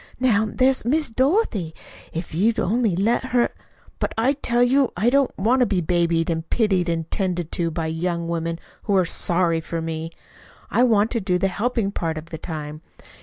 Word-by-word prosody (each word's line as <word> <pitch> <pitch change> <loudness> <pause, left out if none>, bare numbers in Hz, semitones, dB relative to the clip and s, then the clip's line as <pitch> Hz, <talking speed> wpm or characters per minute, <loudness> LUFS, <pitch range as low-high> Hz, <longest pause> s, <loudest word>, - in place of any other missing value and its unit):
"Now 220 -4 +2
there's 260 +1 +2
Miss 290 +2 +1
Dorothy 255 - +1 0.4
if 165 0 -5
you'd 215 +7 +2
only 220 -1 +1
let 225 +7 +1
her 245 -2 +1 0.2
" - - -29
"But - - -2
I 250 +5 +3
tell 245 -4 +1
you 265 +1 +3
I 225 +6 +2
don't 275 0 +3
want 235 +7 +2
to 250 - +4
be 195 - +1
babied 170 -1 +1
and 165 -1 -3
pitied 190 -6 +1
and 165 -1 -2
'tended 180 -4 -2
to 170 -1 0
by 165 0 -3
young 170 +1 -2
women 165 0 -2 0.3
who 200 - +1
are 185 - +3
SORRY 170 -1 +1
for 165 +1 -4
me. 160 0 -4 0.6
I - - +3
want 225 -3 +3
to 230 - -1
do 185 -1 +1
the 195 +2 +1
helping 215 +1 -1
part 165 -4 -3
of 160 +2 -9
the 160 - -6
time. 155 -2 -6
185 Hz, 195 wpm, -23 LUFS, 165-240 Hz, 0.6 s, to